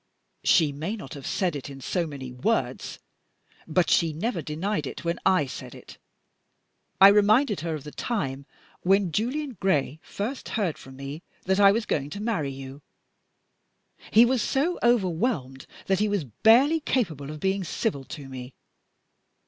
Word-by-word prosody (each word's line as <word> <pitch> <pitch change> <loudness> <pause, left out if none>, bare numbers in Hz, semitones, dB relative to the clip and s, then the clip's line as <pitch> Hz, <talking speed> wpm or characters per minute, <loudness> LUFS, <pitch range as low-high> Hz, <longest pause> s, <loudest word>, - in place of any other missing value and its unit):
"She 155 -4 +4
may 160 +10 -4
not 180 -12 -9
have 140 -3 -8
said 180 -5 0
it 140 0 -6
in 135 -1 -9
so 170 +6 -1
many 135 -4 -7
words; 125 0 -1 0.7
but 170 +2 +2
she 165 -2 +3
never 175 +3 -2
denied 155 +2 -2
it - - -8
when 170 0 -1
I 185 -6 +4
said 130 -2 -8
it. - - -13 1.0
I 195 +1 +10
reminded 210 +3 +4
her 165 -1 -3
of 150 - -7
the 150 - -8
time 140 - -3 0.3
when 195 -1 +3
Julian 255 - -2
Gray 155 -6 +1
first 235 +7 -5
heard 185 -8 -1
from 135 0 -12
me 140 +4 -7 0.2
that 190 +1 +1
I 200 -1 +8
was 220 +2 0
going 145 -1 -1
to 200 - -7
marry 210 -10 -1
you: 135 +1 -9 1.3
he 230 +3 +7
was 250 -1 +1
so 295 +10 0
overwhelmed 185 - 0 0.2
that 195 -1 +1
he 210 - +2
was 205 -5 0
barely 230 - +4
capable 165 - -1
of 155 0 -7
being 190 +3 0
civil 165 - -2
to 145 -2 -8
me. 130 -1 -9
175 Hz, 165 wpm, -26 LUFS, 140-210 Hz, 1.3 s, I